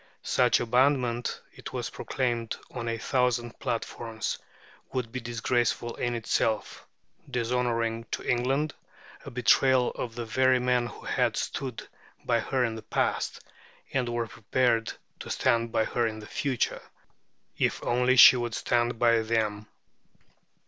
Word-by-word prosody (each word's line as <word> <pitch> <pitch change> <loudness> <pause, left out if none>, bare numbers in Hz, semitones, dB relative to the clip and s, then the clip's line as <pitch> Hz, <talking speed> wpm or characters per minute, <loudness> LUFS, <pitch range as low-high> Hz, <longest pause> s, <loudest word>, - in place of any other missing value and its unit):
Such 125 -1 +3
abandonment, 125 0 +1
it - - -9
was - - -3
proclaimed 120 -3 -2 0.2
on 120 -2 -5
a 115 0 -1
thousand 120 0 0
platforms, 115 -1 -3 0.5
would 125 -3 -3
be 130 - -3
disgraceful 120 -1 -1
in 120 -1 -2
itself, 110 -1 -1 0.4
dishonouring 115 -2 -1
to - - -5
England, 135 +5 +1 0.5
a - - -6
betrayal 125 +1 +3
of 115 -2 -5
the 120 -1 -4
very 130 +3 +3
men 125 -1 +1
who - - -11
had - - 0
stood 130 -4 -4 0.4
by 120 -1 +2
her 125 +2 0
in 115 - -2
the 110 - -7
past, - - -1 0.5
and 125 -3 0
were 120 0 -1
prepared 115 +1 0 0.3
to - - -8
stand 115 -2 +1
by 110 - +2
her 120 -1 0
in 110 -1 -4
the 110 - -9
future, 130 +2 -1 0.8
if - - 0
only 125 +1 +2
she 130 - +10
would 120 -2 -2
stand 120 -1 0
by 115 0 +4
them. 110 -2 -1
120 Hz, 140 wpm, -28 LUFS, 115-125 Hz, 0.8 s, she